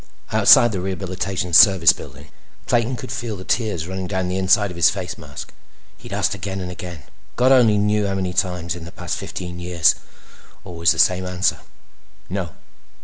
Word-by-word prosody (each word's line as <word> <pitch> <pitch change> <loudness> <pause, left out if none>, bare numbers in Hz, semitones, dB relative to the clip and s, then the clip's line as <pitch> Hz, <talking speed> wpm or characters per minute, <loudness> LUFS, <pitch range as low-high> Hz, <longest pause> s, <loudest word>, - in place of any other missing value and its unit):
Outside 120 - +6
the 95 -4 -3
Rehabilitation 95 -1 -4
Service 95 -1 +7
Building, 70 +3 -12 0.4
Clayton 120 +2 0
could 110 - -8
feel 120 -4 -4
the 90 - -9
tears 105 -7 -1
running 95 0 -5
down 95 -1 -2
the 90 - -2
inside 95 +1 +2
of - - -9
his 85 - +4
face 95 -3 -5
mask. 75 -5 -10 0.4
He'd - - -13
asked - - 0
again 95 -1 -5
and 90 -1 -5
again—God 90 - -4
only 120 -5 +5
knew 105 0 +1
how 100 - -2
many 95 -2 -3
times—in 90 -2 -2
the 85 - -10
past - - -5
fifteen 90 -1 -7
years. 85 -2 +2 0.7
Always 85 -2 +1
the 85 - -2
same 90 +2 +3
answer. 90 +1 0 0.7
No. 95 -2 -3
95 Hz, 170 wpm, -21 LUFS, 90-100 Hz, 0.7 s, Service